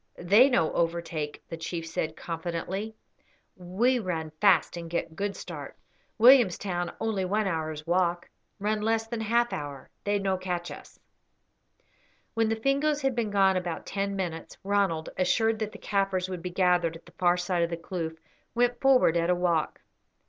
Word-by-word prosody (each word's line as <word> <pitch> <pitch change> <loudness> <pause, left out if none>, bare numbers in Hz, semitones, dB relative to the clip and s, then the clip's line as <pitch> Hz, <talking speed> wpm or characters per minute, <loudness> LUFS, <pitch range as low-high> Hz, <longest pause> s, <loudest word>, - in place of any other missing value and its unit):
"They 205 +10 +5
no 165 -11 +2
overtake," 165 -3 -2
the 165 - -6
chief 165 0 -4
said, 160 -1 -3
confidently. 175 +6 -4 0.6
"We 205 +8 +1
run 165 -6 -3
fast 195 -6 +4
and 170 -1 -6
get 165 -1 -3
good 200 +2 -2
start. - - -8 0.4
Williamstown 200 -8 +4
only 220 -4 -1
one 205 +3 0
hour's 155 -4 -3
walk; 175 0 +1 0.3
run 210 +1 -1
less 225 +1 +1
than 225 0 -4
half 235 +2 +1
hour. 145 -2 -6
They 205 0 +1
no 195 -1 0
catch 180 -2 -3
us." - - -12 1.3
When 225 -1 +1
the 225 - +1
Fingoes 280 +5 +1
had 270 -1 +2
been 230 -3 -1
gone 195 -2 +3
about 175 -3 -4
ten 200 0 -2
minutes, 170 -4 -4
Ronald, 195 -5 0
assured 220 +5 +2
that 215 -1 -2
the - - -10
Kaffirs 195 -2 -1
would 180 -2 -5
be 180 - -4
gathered 180 -2 +2
at 165 - -13
the - - -16
far 175 -1 +2
side 175 0 0
of 170 - +1
the 170 - -3
kloof, 165 -2 -5 0.4
went 245 0 +1
forward 260 -11 +5
at 170 0 +1
a 180 - +4
walk. 170 -3 0
185 Hz, 170 wpm, -28 LUFS, 170-215 Hz, 1.3 s, They